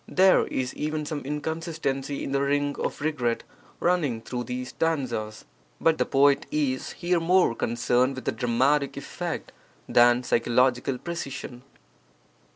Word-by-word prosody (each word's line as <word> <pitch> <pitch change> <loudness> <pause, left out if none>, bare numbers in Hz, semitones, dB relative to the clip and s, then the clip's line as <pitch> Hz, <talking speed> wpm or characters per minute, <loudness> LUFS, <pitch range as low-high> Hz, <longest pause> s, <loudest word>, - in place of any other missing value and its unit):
There 190 0 +4
is 130 -1 -2
even 155 0 -3
some 150 0 -3
inconsistency 150 -2 -3
in - - -4
the 140 0 +1
ring 145 0 +1
of - - -3
regret 130 -7 -1 0.4
running 160 -10 +1
through 120 +1 -5
these 125 +1 -4
stanzas. 125 -10 -2 0.3
But 165 -1 +2
the - - +1
poet 140 +1 +3
is 140 -4 -1
here 175 0 0
more 180 -4 +3
concerned 120 +3 +1
with 130 -4 -3
dramatic 130 +4 +1
effect - - -5 0.4
than 120 +1 +5
psychological 125 +2 +2
precision. 140 -6 -6
135 Hz, 130 wpm, -26 LUFS, 125-155 Hz, 0.4 s, than